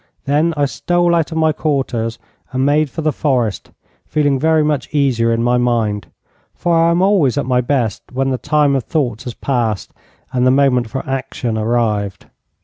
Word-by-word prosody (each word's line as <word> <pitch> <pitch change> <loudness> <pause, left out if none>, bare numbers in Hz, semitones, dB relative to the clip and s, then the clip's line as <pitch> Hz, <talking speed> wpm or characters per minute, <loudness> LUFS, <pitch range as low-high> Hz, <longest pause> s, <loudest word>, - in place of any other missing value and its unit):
Then 155 +4 +1
I 145 - +2
stole 175 +4 +1
out 165 -1 +1
of 160 - -3
my 160 -1 +3
quarters 130 -7 -2 0.3
and 130 0 0
made 150 +1 +2
for 160 - -5
the 155 - +2
forest, 125 -8 -1 0.4
feeling 145 -3 +1
very 160 +1 +3
much 150 -5 -1
easier 130 -6 +1
in 115 0 0
my 125 +1 +2
mind, 115 -4 0 0.5
for 175 - 0
I 165 0 +4
am 170 +2 +2
always 185 - +3
at 140 - 0
my 125 -1 +2
best 125 -4 -1
when 135 +1 -1
the 130 - -2
time 150 -1 +2
of 135 - 0
thought 125 -8 -1
has 125 - -6
passed 115 -7 -2 0.4
and 125 -1 +1
the 130 - +5
moment 130 -3 +2
for 135 +4 -5
action 135 -3 -3
arrived. 110 -3 -1
135 Hz, 185 wpm, -17 LUFS, 120-150 Hz, 0.5 s, the